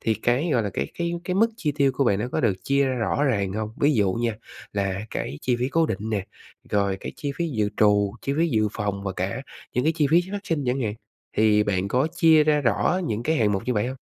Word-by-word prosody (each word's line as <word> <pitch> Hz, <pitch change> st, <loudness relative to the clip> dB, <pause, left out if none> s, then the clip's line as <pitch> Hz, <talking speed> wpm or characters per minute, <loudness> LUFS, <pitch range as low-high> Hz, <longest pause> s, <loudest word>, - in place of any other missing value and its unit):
thì 110 Hz, -, +1 dB
cái, 120 Hz, -, 0 dB
gọi 120 Hz, -4 st, +2 dB
là, 100 Hz, -, -2 dB
cái-cái 170 Hz, -, -3 dB
cái 180 Hz, +1 st, -2 dB
mức 225 Hz, +4 st, +4 dB
chi 150 Hz, -8 st, -1 dB
tiêu 140 Hz, -2 st, +3 dB
của 135 Hz, +1 st, +1 dB
bạn 100 Hz, -4 st, +2 dB
nó 120 Hz, +4 st, -2 dB
có -, -, 0 dB
được 110 Hz, -6 st, +2 dB
chia 140 Hz, 0 st, +2 dB
ra 130 Hz, -, 0 dB
rõ 125 Hz, +4 st, 0 dB
ràng 100 Hz, -8 st, 0 dB
hông? 110 Hz, +1 st, -3 dB
Ví 145 Hz, +2 st, +4 dB
dụ 100 Hz, -5 st, +2 dB
nha, 115 Hz, 0 st, -1 dB, 0.4 s
là 100 Hz, -1 st, -1 dB
cái 70 Hz, -, -4 dB
chi 125 Hz, -1 st, 0 dB
phí 125 Hz, +2 st, -1 dB
cố 165 Hz, +2 st, +2 dB
định 105 Hz, -, -2 dB
nè, 100 Hz, -3 st, -2 dB, 0.4 s
rồi 100 Hz, -1 st, +1 dB
cái -, -, -6 dB
chi 145 Hz, -1 st, -3 dB
phí 170 Hz, -1 st, -1 dB
dự 105 Hz, -7 st, 0 dB
trù, 105 Hz, -1 st, +3 dB
chi 140 Hz, -, -1 dB
phí 170 Hz, +1 st, +3 dB
dự 110 Hz, -5 st, +2 dB
phòng 100 Hz, -2 st, -3 dB
và 95 Hz, -, -2 dB
cả 95 Hz, +9 st, -3 dB, 0.3 s
những 125 Hz, +3 st, 0 dB
cái 160 Hz, -, +3 dB
chi 150 Hz, -3 st, +3 dB
phí 170 Hz, +2 st, +6 dB
phát 205 Hz, -, -1 dB
sinh 155 Hz, -4 st, -1 dB
chẳng 125 Hz, +2 st, 0 dB
hạn, 105 Hz, -4 st, -1 dB, 0.4 s
thì 105 Hz, -1 st, +4 dB
bạn 95 Hz, -2 st, -1 dB
có 130 Hz, +8 st, +2 dB
chia 160 Hz, -3 st, +6 dB
ra 150 Hz, -1 st, +3 dB
rõ 145 Hz, +7 st, +1 dB
những 110 Hz, +1 st, -2 dB
cái 160 Hz, +5 st, +1 dB
hạng 105 Hz, -6 st, +2 dB
mục 95 Hz, -, -1 dB
như 125 Hz, -, +1 dB
vậy 105 Hz, +2 st, +1 dB
hông? 130 Hz, +1 st, -4 dB
120 Hz, 265 wpm, -24 LUFS, 105-145 Hz, 0.4 s, phí